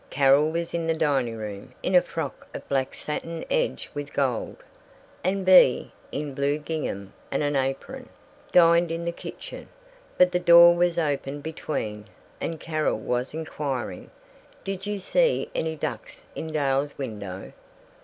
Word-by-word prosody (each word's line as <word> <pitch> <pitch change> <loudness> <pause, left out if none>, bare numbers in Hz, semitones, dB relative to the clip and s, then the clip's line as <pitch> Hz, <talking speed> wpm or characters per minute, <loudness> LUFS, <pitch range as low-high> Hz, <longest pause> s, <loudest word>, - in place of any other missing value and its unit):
Carol 140 +2 +4
was 170 +1 -3
in 165 -1 -1
the 165 - +2
dining 135 -7 +1
room, 105 +4 -7
in 185 - 0
a 180 - +7
frock 160 -5 -6
of - - -7
black 135 -1 -1
satin 165 +2 -5
edged - - 0
with 145 -1 -6
gold, 130 -5 -1 0.7
and 190 +1 0
Bea, 185 -9 +6 0.2
in 145 -1 -4
blue 140 +2 0
gingham 150 -11 -4 0.2
and - - -1
an 145 0 0
apron, 135 0 -3 0.4
dined 170 -1 +6
in 165 +1 -3
the 170 - -1
kitchen; - - -9 0.5
but 180 0 +6
the 180 - +1
door 170 0 +8
was 175 0 +2
open 145 -3 -1
between, 140 -9 -4 0.4
and 165 -1 -3
Carol 155 -6 -1
was 125 +5 -2
inquiring, 140 - -4 0.5
"Did 195 0 -4
you 205 -1 -2
see - - +1
any 160 0 -1
ducks - - -6
in 160 - -5
Dahl's 140 -1 0
window?" 105 -8 -6
150 Hz, 150 wpm, -26 LUFS, 135-170 Hz, 0.7 s, door